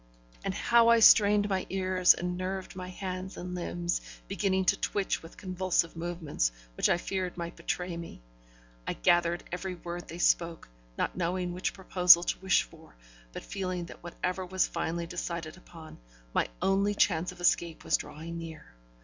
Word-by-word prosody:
And - - -2
how 235 -1 +4
I 235 0 +6
strained 210 -2 +7
my 190 -2 -1
ears, 185 -1 +4
and 180 0 -3
nerved 185 +1 -4
my 185 -1 -6
hands 185 0 -6
and 180 +1 -6
limbs, 85 - -2 0.3
beginning 190 - 0
to - - +3
twitch 200 -2 -1
with 165 - -13
convulsive 185 -3 0
movements, 165 - -2 0.2
which - - +2
I - - +3
feared 185 0 -3
might 170 -1 -5
betray 180 -1 -3
me! 170 0 -8 0.7
I - - 0
gathered 175 - +2
every 180 +1 -4
word 175 0 -7
they 170 - -8
spoke, 170 -1 +1 0.3
not - - -1
knowing 180 0 -1
which 180 +1 -2
proposal 180 -2 +6
to - - -2
wish 190 0 +3
for, - - -17 0.4
but - - -8
feeling 185 -3 -4
that - - -12
whatever 180 +2 -3
was 185 +1 +1
finally 170 +1 -3
decided 170 -2 -5
upon, 165 -3 -13 0.3
my - - +2 0.2
only 200 +2 +2
chance 175 -3 +2
of - - -14
escape 170 -2 +1
was - - +2
drawing 170 +2 -6
near. 160 - -10
180 Hz, 165 wpm, -29 LUFS, 170-190 Hz, 0.7 s, strained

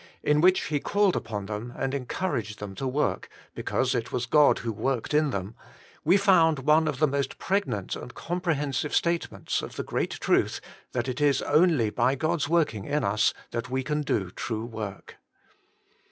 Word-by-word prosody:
in 150 0 +3
which 185 +2 +5
he 150 -1 -1
called 200 +4 +2
upon 105 -3 -4
them 105 +4 -5
and 135 +1 -2
encouraged 125 - -3
them 105 -1 -7
to 135 +7 -4
work, 140 +4 -1 0.2
because - - -1
it 115 - -2
was 125 - -1
God 150 +4 +5
who 115 - -3
worked 130 +5 -2
in 150 0 +3
them, 100 -3 -4 0.5
we 180 +6 +5
found 175 -6 +4
one 150 +4 +3
of 150 -4 -1
the 155 - +4
most 140 -2 -2
pregnant 185 - -1
and 125 - -9
comprehen 165 -5 -2
sive 150 +4 -1
statements 170 0 0
of - - -8
the - - -3
great - - -1
truth - - +1 0.3
that 120 0 -1
it 130 +2 -3
is 145 -2 +3
only 150 -8 +3
by 130 +5 +2
God's 155 +1 -1
working 155 - +1
in 145 -1 0
us 105 0 +2 0.2
that 120 +1 -4
we 130 +1 -1
can 150 +2 -1
do 100 -10 -1
true 110 +2 -4
work. 110 -4 -7
135 Hz, 180 wpm, -27 LUFS, 115-155 Hz, 0.5 s, which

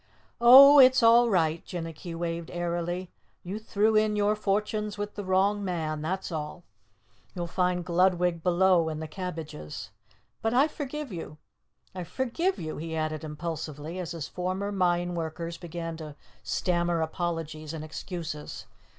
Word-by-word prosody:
"Oh, 275 +4 +10
it's 255 -1 +7
all 235 +1 +6
right," 165 -5 +1
Jinnicky 165 0 -6
waved 165 0 -3
airily. 175 +1 -3 0.3
"You 195 +4 -5
threw 220 0 +1
in 215 0 +3
your 210 +1 +2
fortunes 210 0 -1
with 205 0 -4
the 205 - -6
wrong 195 +2 +2
man, 160 -5 -2
that's 185 +4 -3
all! 155 +2 -5 0.7
You'll 175 -1 -3
find 180 0 0
Gludwig 180 -1 +2
below 180 -1 +3
in 155 -1 -4
the 160 - -5
cabbages. 155 - -7 0.5
But 225 +2 0
I 275 +4 +5
forgive 295 -2 -6
you! 165 -4 -7 0.6
I 185 -1 -5
forgive 260 - -1
you!" 155 -1 -5
he 160 +1 -5
added 155 -1 -2
impulsively 155 +1 -5
as 175 -3 -4
his 160 -3 -5
former 185 +4 -3
mine 175 -2 +1
workers 165 0 -4
began 165 -1 -6
to 155 -2 -8 0.3
stammer 175 -1 0
apologies 160 -2 -3
and 160 -2 -6
excuses. 160 -1 -6
175 Hz, 145 wpm, -28 LUFS, 160-205 Hz, 0.7 s, Oh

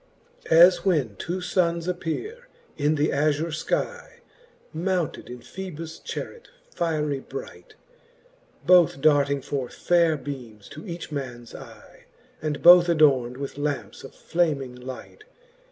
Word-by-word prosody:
XIX. - - -12
As 175 +1 +7
when 150 - +1
two 180 - -4
funnes 170 -2 0
appeare 400 - -4 0.3
in 150 +1 +1
th' 150 +1 +1
azure 150 +3 0
skyc, 480 - -3 0.5
Mounted 175 -3 -2
in 125 0 -9
Phosbus 165 +3 -8
charet 475 - -7 0.3
fierie 150 -4 -1
bright, - - -9 0.9
Both 175 -6 +5
darting 140 -2 +2
forth 135 -4 -4
faire 170 -3 +2
beames 125 -7 -9
to 155 +7 -10
each 170 -2 -7
mans 125 -5 -6
eye, - - -13 0.4
And 150 -2 -3
both 175 0 +8
adorn'd 135 -7 +3
with 140 +1 -6
lampes 135 -8 -4
of 135 - -11
flaming 150 -7 -1
light. 130 - -10
155 Hz, 125 wpm, -25 LUFS, 140-175 Hz, 0.9 s, both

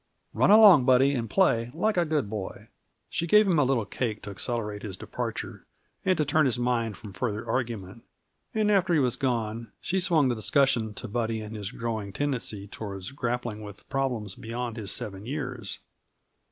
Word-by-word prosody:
Run - - +3
along, 200 - +9
Buddy, 130 +2 +5
and 115 -4 -2
play 120 -12 +3
like 215 +6 +1
a 175 -1 +3
good 150 -7 0
boy." 100 -2 -6 0.4
She 170 - -2
gave 210 +4 +6
him 170 -5 +3
a - - +5
little 130 -5 +1
cake 110 +1 -3
to 100 - -6
accelerate 105 0 -3
his 95 -4 -5
departure - - -5 0.4
and 185 -1 +2
to 150 - +2
turn 155 0 +3
his 125 - 0
mind 120 -4 0
from 105 -3 -10
further 110 +3 -3
argument, 115 -4 -3 0.5
and 215 -1 +2
after 185 -4 +3
he - - +4
was 125 -4 +2
gone 115 -4 -2
she 190 +2 -1
swung 165 -6 +3
the 125 - +2
discussion 115 -2 +1
to 120 - -5
Buddy 115 0 -1
and 110 0 -7
his 100 -2 -4
growing 110 -4 -4
tendency 120 -7 -2
toward 100 +2 -7
grappling 120 -4 -2
with 105 -1 -11
problems 125 -7 -1
beyond 115 +2 -5
his 105 -4 -5
seven 100 +1 -6
years. 125 -7 -4
120 Hz, 180 wpm, -27 LUFS, 105-140 Hz, 0.5 s, along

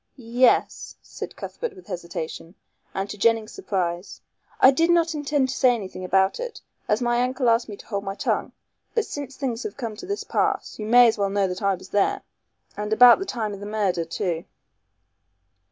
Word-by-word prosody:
"Yes," 245 0 +1
said - - -8
Cuthbert 475 -4 -6
with 370 - -14
hesitation, 170 -1 -6 0.4
and 195 +1 -3
to 210 - -8
Jennings' 225 0 +2
surprise, 180 - -3 0.4
"I 260 - +8
did 330 +5 +2
not 340 -1 +3
intend 290 -3 0
to 265 - -3
say 250 -2 +4
anything 190 -4 -7
about 190 - +2
it, - - -5 0.3
as 215 +4 +1
my 240 0 +2
uncle 255 0 0
asked 230 0 +3
me 205 - -7
to - - -14
hold 200 -3 -3
my 195 -1 -4
tongue. - - -1 0.4
But 455 - +2
since 280 -2 -6
things 255 -4 -3
have 420 - -6
come 230 -5 -4
to 300 - -9
this 405 +1 -3
pass, - - -1
you 215 - -4
may 245 +1 +7
as 220 -2 0
well 200 -1 +1
know 200 0 +1
that 180 +2 -5
I 200 -1 +2
was 185 +1 -13
there 205 -1 +1 0.5
and 210 +1 -4
about 240 +4 +8
the 390 - -3
time 220 - -3
of 200 - -8
the 205 - -7
murder 200 -5 0
too." 165 +1 -3
225 Hz, 200 wpm, -24 LUFS, 195-260 Hz, 0.5 s, I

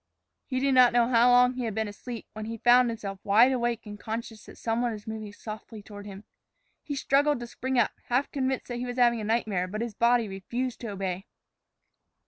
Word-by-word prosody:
He 255 -2 -1
did 275 0 +2
not 250 -2 +6
know 240 0 +3
how 240 0 +5
long 250 0 +5
he 250 -1 -3
had 220 -3 -3
been 220 -1 -1
asleep 230 +3 -7
when 215 0 -6
he 230 +1 -5
found 245 +2 +5
himself 200 -4 -5
wide 225 +6 +5
awake 240 -3 -1
and 205 -1 -9
conscious 225 0 -6
that - - -12
some 225 +1 -1
one 240 -2 0
was 210 -1 -9
moving 220 -1 -6
softly 215 0 -9
toward 205 0 -10
him. 200 0 -9 0.6
He 290 - -5
struggled 280 +1 +2
to 240 - -5
spring 260 +2 -3
up, 235 - +3
half 250 +4 0
convinced 265 -2 -2
that 245 - -3
he 250 - -3
was 245 +1 -5
having 240 -2 +3
a - - -5
nightmare, 210 -4 0
but 210 +4 -4
his 235 -2 -3
body 235 +1 +3
refused 235 +6 -4
to 235 - -6
obey. 195 -2 -4
230 Hz, 220 wpm, -27 LUFS, 215-245 Hz, 0.6 s, not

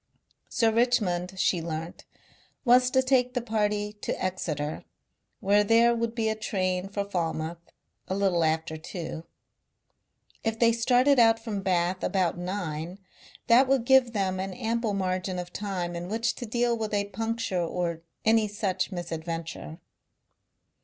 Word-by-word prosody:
Sir 225 -1 +2
Richmond, 205 -7 +1
she 180 -1 +2
learnt, 165 +1 -6 0.6
was 250 +1 +6
to 260 0 +3
take 255 -1 +2
the - - +2
party 210 -2 0
to - - -3
Exeter, 155 -5 -3 0.6
where 205 +1 +4
there 230 +3 +5
would 230 0 -2
be 225 -2 0
a 220 - +2
train 185 -3 -2
for 200 0 -2
Falmouth 170 -3 -2 0.5
a 190 - -2
little 190 -4 +2
after 160 0 0
two. 165 0 -6 1.2
If 225 0 -1
they 230 0 +5
started 250 +4 +3 0.2
from 220 -3 -4
Bath 185 -1 0
about 185 -4 +1
nine 175 -2 -4 0.5
that 250 +3 +6
would 265 -3 +2
give 260 -2 +5
them 190 -3 0
an 190 0 -4
ample 225 -1 -1
margin 185 -1 -1
of 180 0 -6
time 185 -4 -3
in 175 +1 -5
which 230 +2 0
to 240 - -5
deal 240 +1 +1
with 220 -2 -2
a 200 0 +1
puncture 225 -2 -2
or 170 -1 -2 0.2
any 220 0 +4
such 200 -2 -2
misadventure. 165 -2 -5
200 Hz, 145 wpm, -27 LUFS, 175-230 Hz, 1.2 s, was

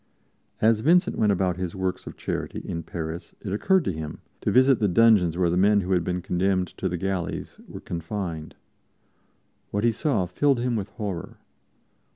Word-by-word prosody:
As 110 0 +4
Vincent 175 - +3
went 105 -2 +4
about 90 -2 0
his 90 -2 -4
works 95 -1 -3
of - - -8
charity - - -4
in 85 - -3
Paris 80 0 -6
it 100 - -5
occurred 185 - +2
to - - +1
him 80 -2 -6 0.2
to - - 0
visit 130 0 +5
the 105 - +2
dungeons 95 -4 +4
where 90 -2 +2
the 90 - +1
men 100 +2 +4
who 95 +1 -4
had 90 -2 +3
been 90 0 -2
condemned 95 0 +1
to 95 - 0
the 90 - -2
galleys 95 -2 -3
were - - -9
confined. 85 -2 -5 1.1
What 100 +1 -1
he 120 - +4
saw 115 - 0
filled 135 +9 +1
him 120 0 0
with 100 -2 -3
horror. 100 -6 -5
95 Hz, 185 wpm, -25 LUFS, 90-110 Hz, 1.1 s, visit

